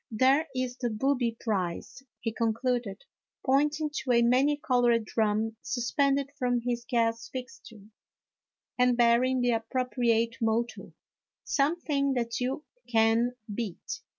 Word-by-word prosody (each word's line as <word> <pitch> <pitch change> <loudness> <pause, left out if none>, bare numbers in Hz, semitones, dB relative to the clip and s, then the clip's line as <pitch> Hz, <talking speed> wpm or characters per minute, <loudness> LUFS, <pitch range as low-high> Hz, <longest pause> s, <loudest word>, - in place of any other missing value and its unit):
There 265 +7 +3
is 255 -1 -2
the 245 -2 -1
booby 240 0 0
prize," 190 +1 -3 0.2
he 225 - -2
concluded, 230 0 -1 0.4
pointing 295 +3 +2
to 255 - 0
a 235 0 +4
many 265 +5 +3
colored 240 -5 +2
drum 220 0 0
suspended 275 +2 0
from 245 -1 +1
his 240 0 -3
gas 230 -1 0
fixture, 245 -5 -9 0.9
and 250 -1 +4
bearing 245 +2 +3
the 245 0 +2
appropriate 230 -1 0
motto, 230 +1 -1 0.2
" - - -66
Something 280 -2 0
that 235 -2 -2
you 270 +5 -2 0.3
can 225 +2 +3 0.2
beat." 235 - -5
245 Hz, 125 wpm, -28 LUFS, 230-265 Hz, 0.9 s, a